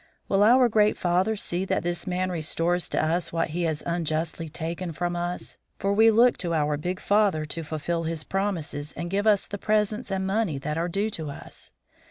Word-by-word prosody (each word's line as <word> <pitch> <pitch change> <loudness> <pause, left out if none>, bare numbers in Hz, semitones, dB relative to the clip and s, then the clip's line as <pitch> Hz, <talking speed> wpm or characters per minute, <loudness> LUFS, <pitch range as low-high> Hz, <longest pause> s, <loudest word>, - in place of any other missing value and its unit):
Will 195 0 +2
our 245 +4 +6
great 215 -2 +3
father 185 +5 +1
see 180 -3 -2
that 195 - -1
this 175 +2 -2
man 185 0 -1
restores 170 +1 -1
to - - +1
us 170 +2 0
what 165 0 0
he 170 +3 -1
has 155 -2 -2
unjustly 165 -1 -2
taken 165 +2 -4
from 175 +3 -2
us, 175 +1 -4 0.2
for 195 +1 0
we 220 +2 +6
look 235 +3 +4
to 170 -2 -1
our 150 -1 +1
big 180 +5 -3
father 200 -7 +2
to 160 +2 -4
fulfill 160 +2 -2
his 160 -1 -3
promises 170 -7 -3
and 170 0 -4
give 200 +2 0
us 205 -2 +4
the 200 - -6
presents 215 +2 0
and 190 -1 -1
money 195 -6 0
that 150 +3 -3
are 170 +2 -1
due 200 +5 0
to 160 -6 -4
us. 140 - -10
175 Hz, 205 wpm, -26 LUFS, 160-200 Hz, 0.2 s, our